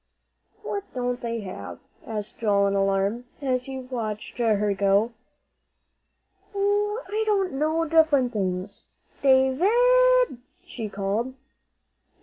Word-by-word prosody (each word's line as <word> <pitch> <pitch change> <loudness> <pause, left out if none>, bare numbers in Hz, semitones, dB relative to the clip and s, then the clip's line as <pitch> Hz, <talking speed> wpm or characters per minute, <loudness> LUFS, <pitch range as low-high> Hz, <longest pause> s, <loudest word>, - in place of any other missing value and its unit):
"What 405 -2 -3
don't 245 0 -2
they 230 -1 -3
have?" 185 - -7 0.3
asked 210 -2 -5
Joel 200 -3 +2
in 200 - +1
alarm, 195 +4 0
as 255 -3 -1
he 270 -1 -6
watched 235 -4 -5
her 210 -3 +2
go. 200 +3 +2 1.4
"Oh, 415 +3 0
I 430 +1 -2
don't 390 -5 +1
know; 310 +4 0
different 300 -6 +3
things. 190 -1 -3 0.4
Da 265 -1 +5
vid!" - - +4 0.3
she 230 -11 -6
called. 205 +6 -2
250 Hz, 115 wpm, -25 LUFS, 205-325 Hz, 1.4 s, Da